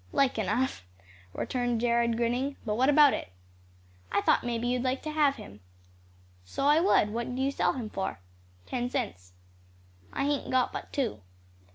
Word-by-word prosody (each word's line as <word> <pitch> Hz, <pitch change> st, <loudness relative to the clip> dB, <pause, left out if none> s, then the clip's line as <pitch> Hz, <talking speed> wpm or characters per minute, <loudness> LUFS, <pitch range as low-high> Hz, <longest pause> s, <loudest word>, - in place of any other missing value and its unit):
"Like 270 Hz, -4 st, +2 dB
enough," 215 Hz, -, -1 dB, 0.5 s
returned 245 Hz, -, -1 dB
Jared, 235 Hz, -1 st, +2 dB
grinning. 245 Hz, +4 st, 0 dB
"But 210 Hz, -, 0 dB
what 255 Hz, +5 st, +3 dB
about 290 Hz, -1 st, +7 dB
it?" -, -, -4 dB, 0.8 s
"I 200 Hz, -, +2 dB
thought -, -, +3 dB
may 240 Hz, -1 st, -1 dB
be 240 Hz, +1 st, -2 dB
you'd 250 Hz, 0 st, 0 dB
like 260 Hz, +1 st, -1 dB
to 310 Hz, -, -3 dB
have 295 Hz, -2 st, +3 dB
him." 100 Hz, -, -11 dB, 0.8 s
"So 90 Hz, -, -3 dB
I 295 Hz, +2 st, +5 dB
would, 325 Hz, -, +3 dB
what'll 235 Hz, +3 st, -3 dB
you 270 Hz, +1 st, +1 dB
sell -, -, +1 dB
him 245 Hz, -5 st, -4 dB
for?" 190 Hz, -, -3 dB, 0.5 s
"Ten 245 Hz, -1 st, -2 dB
cents." 90 Hz, -, -4 dB, 0.8 s
"I -, -, -2 dB
hain't 290 Hz, -1 st, -1 dB
got 255 Hz, -1 st, +1 dB
but -, -, -6 dB
two." 240 Hz, -, -2 dB
245 Hz, 170 wpm, -29 LUFS, 230-275 Hz, 0.8 s, about